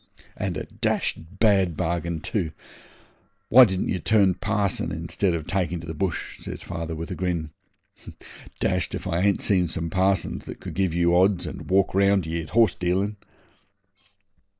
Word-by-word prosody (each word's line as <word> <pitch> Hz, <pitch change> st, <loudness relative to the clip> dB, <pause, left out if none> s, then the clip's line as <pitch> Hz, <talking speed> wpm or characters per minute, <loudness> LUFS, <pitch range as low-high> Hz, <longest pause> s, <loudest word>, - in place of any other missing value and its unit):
'And -, -, -3 dB
a -, -, -3 dB
dashed -, -, -1 dB, 0.2 s
bad 95 Hz, -6 st, +3 dB
bargain 85 Hz, -1 st, -2 dB
too. 80 Hz, -3 st, -2 dB, 1.0 s
Why 130 Hz, +2 st, +9 dB
didn't 95 Hz, -3 st, -2 dB
ye 95 Hz, -, 0 dB
turn 100 Hz, 0 st, +3 dB
parson 100 Hz, -2 st, -1 dB
instead 85 Hz, +3 st, -1 dB
of 80 Hz, -2 st, -4 dB
taking 90 Hz, -2 st, -1 dB
to 80 Hz, -, -9 dB
the 80 Hz, -, -5 dB
bush?' 90 Hz, +1 st, -3 dB
says -, -, -7 dB
father, 80 Hz, -1 st, -5 dB
with 80 Hz, +1 st, -6 dB
a -, -, -3 dB
grin. 85 Hz, -4 st, -2 dB, 1.1 s
'Dashed -, -, 0 dB
if -, -, -6 dB
I 85 Hz, -, -1 dB
ain't 100 Hz, +1 st, +2 dB
seen 90 Hz, -3 st, +2 dB
some 80 Hz, 0 st, -4 dB
parsons 95 Hz, -1 st, 0 dB
that -, -, -8 dB
could -, -, -7 dB
give 95 Hz, -4 st, 0 dB
you 85 Hz, 0 st, +3 dB
odds 95 Hz, 0 st, +3 dB
and -, -, -7 dB
walk 95 Hz, 0 st, +3 dB
round 100 Hz, -1 st, +3 dB
ye 85 Hz, +1 st, -2 dB
at 80 Hz, -, -9 dB
horse 110 Hz, 0 st, +4 dB
dealin'.' 95 Hz, +4 st, -1 dB
90 Hz, 170 wpm, -25 LUFS, 85-100 Hz, 1.1 s, Why